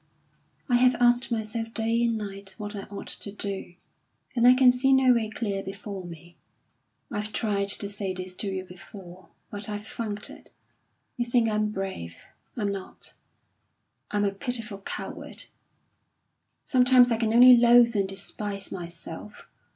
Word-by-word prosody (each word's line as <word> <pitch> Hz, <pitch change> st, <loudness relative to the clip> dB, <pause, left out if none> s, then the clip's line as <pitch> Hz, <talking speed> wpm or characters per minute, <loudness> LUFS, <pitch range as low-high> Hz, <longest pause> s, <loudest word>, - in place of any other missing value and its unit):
"I 245 Hz, -3 st, +4 dB
have 255 Hz, 0 st, +4 dB
asked 240 Hz, +1 st, +3 dB
myself 225 Hz, 0 st, -3 dB
day 230 Hz, +1 st, +1 dB
and 230 Hz, -1 st, +1 dB
night 200 Hz, -2 st, -6 dB
what 210 Hz, -1 st, -6 dB
I 200 Hz, -, -6 dB
ought 200 Hz, -, -7 dB
to 200 Hz, -, -6 dB
do, 195 Hz, -3 st, -5 dB, 0.6 s
and 240 Hz, 0 st, +4 dB
I 250 Hz, -, +8 dB
can 255 Hz, -1 st, +6 dB
see 265 Hz, +2 st, +2 dB
no 265 Hz, -1 st, +5 dB
way 225 Hz, -2 st, 0 dB
clear 205 Hz, -3 st, -3 dB
before 195 Hz, 0 st, -7 dB
me. 170 Hz, 0 st, -11 dB, 0.8 s
I've 210 Hz, +1 st, -3 dB
tried 200 Hz, -3 st, -1 dB
to 200 Hz, 0 st, 0 dB
say 200 Hz, -1 st, -4 dB
this 185 Hz, 0 st, -5 dB
to 205 Hz, -, -4 dB
you 190 Hz, -1 st, -3 dB
before, 180 Hz, 0 st, -13 dB, 0.2 s
but 205 Hz, +1 st, -5 dB
I've 210 Hz, 0 st, -5 dB
funked 210 Hz, -2 st, -5 dB
it. -, -, -15 dB, 0.7 s
You 240 Hz, -, 0 dB
think 235 Hz, -1 st, +2 dB
I'm 215 Hz, 0 st, 0 dB
brave 190 Hz, -, -5 dB, 0.4 s
I'm 205 Hz, -3 st, 0 dB
not; 195 Hz, -1 st, -7 dB, 1.0 s
I'm 205 Hz, 0 st, 0 dB
a 200 Hz, -, +1 dB
pitiful 230 Hz, -2 st, -2 dB
coward! 195 Hz, -, -6 dB, 1.2 s
Sometimes 250 Hz, -1 st, +5 dB
I 230 Hz, -, +2 dB
can 225 Hz, -1 st, 0 dB
only 250 Hz, +2 st, +9 dB
loathe 235 Hz, -1 st, +6 dB
and 195 Hz, -2 st, +1 dB
despise 200 Hz, +1 st, -4 dB
myself. 170 Hz, +2 st, -8 dB
210 Hz, 155 wpm, -26 LUFS, 195-235 Hz, 1.2 s, only